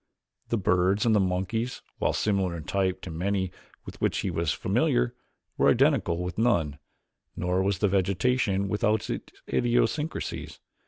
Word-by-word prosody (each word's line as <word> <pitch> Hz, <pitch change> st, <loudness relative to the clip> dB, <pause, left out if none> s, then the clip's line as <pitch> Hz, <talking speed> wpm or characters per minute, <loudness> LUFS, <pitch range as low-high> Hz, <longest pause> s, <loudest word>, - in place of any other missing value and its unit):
The 115 Hz, -, +1 dB
birds 95 Hz, +2 st, +2 dB
and 115 Hz, -, +4 dB
the 105 Hz, -, +4 dB
monkeys, 95 Hz, +6 st, -1 dB, 0.2 s
while -, -, +2 dB
similar 95 Hz, -5 st, 0 dB
in 80 Hz, -, -7 dB
type 95 Hz, +1 st, -1 dB
to 90 Hz, -, -6 dB
many 95 Hz, +2 st, -1 dB, 0.3 s
with -, -, -10 dB
which -, -, +1 dB
he 95 Hz, -, -2 dB
was 85 Hz, -2 st, 0 dB
familiar, -, -, +1 dB, 0.5 s
were -, -, +5 dB
identical 120 Hz, -, +2 dB
with 90 Hz, +3 st, -4 dB
none, 85 Hz, -12 st, +1 dB, 0.6 s
nor 90 Hz, +1 st, 0 dB
was 95 Hz, -1 st, +1 dB
the 105 Hz, -, +2 dB
vegetation 100 Hz, +2 st, +1 dB
without 105 Hz, +2 st, 0 dB
its -, -, -5 dB, 0.2 s
idiosyncrasies. 125 Hz, +6 st, -1 dB
95 Hz, 150 wpm, -27 LUFS, 90-110 Hz, 0.6 s, were